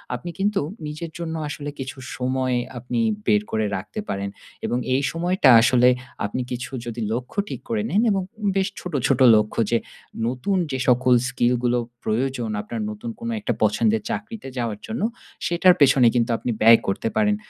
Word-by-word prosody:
আপনি 125 Hz, +8 st, -7 dB
কিন্তু 205 Hz, +1 st, +1 dB, 0.3 s
নিজের 155 Hz, +2 st, -6 dB
জন্য 165 Hz, -1 st, -4 dB
আসলে 145 Hz, 0 st, -5 dB
কিছু 130 Hz, +1 st, -6 dB, 0.2 s
সময় 130 Hz, 0 st, 0 dB, 0.2 s
আপনি 120 Hz, 0 st, -3 dB, 0.3 s
বের 105 Hz, -1 st, +4 dB
করে 110 Hz, -1 st, 0 dB
রাখতে 95 Hz, -, -7 dB
পারেন। 100 Hz, 0 st, -2 dB, 0.4 s
এবং 120 Hz, -, 0 dB, 0.2 s
এই 135 Hz, -, +2 dB
সময়টা 175 Hz, -3 st, +2 dB
আসলে 125 Hz, +1 st, +5 dB, 0.4 s
আপনি 115 Hz, +5 st, -3 dB
কিছু 125 Hz, +1 st, -4 dB
যদি 120 Hz, 0 st, -5 dB
লক্ষ্য 125 Hz, -, -5 dB
ঠিক -, -, -6 dB
করে 225 Hz, -2 st, 0 dB
নেন 205 Hz, -, +2 dB
এবং 195 Hz, -1 st, +1 dB, 0.3 s
বেশ 195 Hz, 0 st, +2 dB
ছোটো, 175 Hz, -5 st, -3 dB
ছোটো 130 Hz, -1 st, +4 dB
লক্ষ্য 105 Hz, +1 st, +1 dB
যে 120 Hz, -, +4 dB, 0.5 s
নতুন 130 Hz, +11 st, -1 dB
যে 130 Hz, -, -2 dB
সকল 125 Hz, 0 st, +4 dB, 0.2 s
স্কিলগুলো 125 Hz, -1 st, +1 dB, 0.3 s
প্রয়োজন 120 Hz, +1 st, -1 dB
আপনার 220 Hz, -, -5 dB
নতুন 215 Hz, +3 st, -7 dB
কোনো 235 Hz, 0 st, -4 dB
একটা 210 Hz, -, -1 dB
পছন্দের 110 Hz, +1 st, +2 dB
চাকরিতে 220 Hz, -5 st, -5 dB
যাওয়ার 115 Hz, -4 st, -2 dB
জন্য, 225 Hz, +1 st, -4 dB, 0.4 s
সেটার 175 Hz, +1 st, +5 dB
পেছনে 135 Hz, -3 st, +6 dB
কিন্তু 120 Hz, -1 st, +2 dB
আপনি 120 Hz, -, -3 dB
ব্যয় 115 Hz, +1 st, +8 dB
করতে 95 Hz, -, -1 dB
পারেন। 210 Hz, -1 st, +3 dB
130 Hz, 170 wpm, -23 LUFS, 120-175 Hz, 0.5 s, ব্যয়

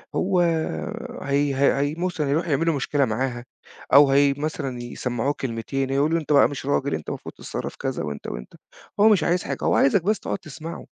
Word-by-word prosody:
هو 185 Hz, -1 st, +1 dB, 0.8 s
هي 140 Hz, 0 st, +1 dB
هي 140 Hz, +1 st, +4 dB
هي 145 Hz, +2 st, 0 dB
م 180 Hz, +2 st, 0 dB
بُصّ 175 Hz, -, -7 dB
يروحوا 150 Hz, +3 st, 0 dB
يعملوا 165 Hz, +3 st, +2 dB
مشكلة 140 Hz, 0 st, +1 dB
معاها، 120 Hz, +1 st, -2 dB, 0.5 s
أو 140 Hz, -1 st, +8 dB
هي 140 Hz, 0 st, +4 dB
مثلًا 140 Hz, -5 st, -3 dB
يسمّعوه 120 Hz, +2 st, -2 dB
كلمتين 130 Hz, +2 st, -2 dB
يقول 140 Hz, +4 st, +1 dB
له 165 Hz, -, +3 dB
أنت 150 Hz, -, -5 dB
بقى 140 Hz, -, +6 dB
مش 140 Hz, -2 st, -6 dB
راجل 140 Hz, 0 st, 0 dB
أنت 80 Hz, -, -6 dB
المفروض -, -, -6 dB
تتصرّف -, -, -6 dB
كذا -, -, -3 dB
وأنت 75 Hz, -1 st, -6 dB
وأنت، -, -, -7 dB, 0.5 s
هو 215 Hz, +2 st, +7 dB
مش 205 Hz, -4 st, +4 dB
عايز 175 Hz, +1 st, +1 dB
حاجة 140 Hz, -, -3 dB
هو -, -, +2 dB
عايزك 160 Hz, +6 st, +3 dB
بس 215 Hz, +2 st, +1 dB
تقعد -, -, -3 dB
تسمعه، 160 Hz, 0 st, -8 dB
140 Hz, 195 wpm, -24 LUFS, 135-160 Hz, 0.8 s, أو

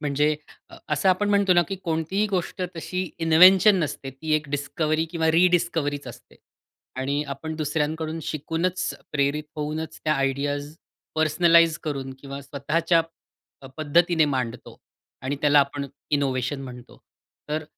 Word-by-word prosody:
म्हणजे 150 Hz, +1 st, +1 dB, 0.3 s
अ, -, -, -12 dB
असं 150 Hz, +5 st, +1 dB
आपण 190 Hz, +3 st, +2 dB
म्हणतो 200 Hz, -2 st, +4 dB
ना, 175 Hz, -1 st, +5 dB
की 195 Hz, -, -3 dB
कोणतीही 165 Hz, +5 st, 0 dB
गोष्ट 185 Hz, -2 st, -3 dB
तशी 185 Hz, +2 st, -3 dB, 0.2 s
इन्व्हेंशन 185 Hz, +5 st, +7 dB
नसते, 145 Hz, -5 st, -3 dB
ती 155 Hz, +4 st, -5 dB
एक 155 Hz, -1 st, -1 dB
डिस्कव्हरी 155 Hz, +2 st, -1 dB
किंवा 160 Hz, -1 st, +1 dB
रिडिस्कव्हरीचं 165 Hz, -4 st, +1 dB
असते. -, -, -17 dB, 0.6 s
आणि 140 Hz, +3 st, -1 dB
आपण 160 Hz, +4 st, -6 dB
दुसऱ्यांकडून 155 Hz, +1 st, -2 dB
शिकूनच, 165 Hz, +5 st, -2 dB, 0.2 s
प्रेरित 145 Hz, +1 st, 0 dB
होऊनच 155 Hz, +1 st, -4 dB
त्या 155 Hz, -1 st, +2 dB
आयडियाज 145 Hz, +2 st, -2 dB, 0.4 s
पर्सनलाइज 165 Hz, +1 st, +4 dB
करून 135 Hz, -3 st, -4 dB
किंवा 140 Hz, 0 st, -7 dB
स्वतःच्या 150 Hz, +5 st, +1 dB, 0.6 s
अ, -, -, -9 dB
पद्धतीने 160 Hz, +2 st, +3 dB
मांडतो 125 Hz, -5 st, -4 dB, 0.4 s
आणि 135 Hz, +2 st, -2 dB
त्याला 145 Hz, 0 st, +5 dB
आपण 140 Hz, 0 st, -2 dB, 0.2 s
इनोव्हेशन 135 Hz, -1 st, 0 dB
म्हणतो. 125 Hz, -2 st, -11 dB, 0.5 s
तर 155 Hz, +1 st, -2 dB
155 Hz, 130 wpm, -24 LUFS, 145-165 Hz, 0.6 s, इन्व्हेंशन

